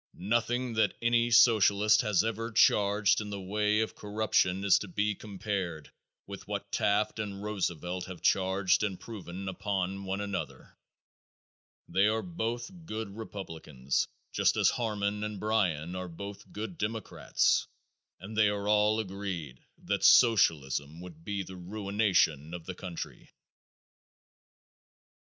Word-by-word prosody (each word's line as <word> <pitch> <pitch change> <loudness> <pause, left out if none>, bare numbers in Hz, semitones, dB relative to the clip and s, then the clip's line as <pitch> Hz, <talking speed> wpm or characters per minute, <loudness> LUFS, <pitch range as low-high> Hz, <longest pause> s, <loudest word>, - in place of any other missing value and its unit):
Nothing 120 +5 0
that 110 -2 +2
any 120 0 +2
Socialist 110 -2 +5
has 105 -5 +2
ever 115 +1 -3
charged 105 -2 +4
in 105 - -6
the 100 -1 -5
way 105 +3 +1
of 110 - -2
corruption 105 -3 0
is 100 - +5
to 105 - -6
be 105 +3 0
compared 95 -6 -4 0.3
with - - -9
what - - -5
Taft 105 +2 +1
and 100 -2 -4
Roosevelt 90 -3 -3
have 95 -2 -10
charged 95 0 +2
and 100 -4 -2
proven 95 -4 -8
upon 95 0 -2
one 95 +1 -2
another. 100 -1 -5 1.1
They 100 +2 +3
are 110 +1 0
both 120 -5 -3 0.2
good 110 -2 -5
Republicans, 80 - -3 0.3
just - - +2
as - - +4
Harmon 105 -3 -2
and 105 -2 -4
Bryan 90 -6 0
are 90 -1 -5
both 100 +4 -9
good 110 - -6
Democrats 110 -1 0 0.5
and 100 +4 -9
they 105 -1 +4
are 100 0 -3
all 105 +1 +3
agreed 95 - -5 0.2
that - - -2
Socialism 80 - +4
would 85 -3 -11
be 100 +1 -3
the 95 0 -10
ruination 95 -5 0
of 85 -2 -9
the 95 - -5
country. 90 -2 -8
100 Hz, 135 wpm, -30 LUFS, 95-110 Hz, 1.1 s, Socialist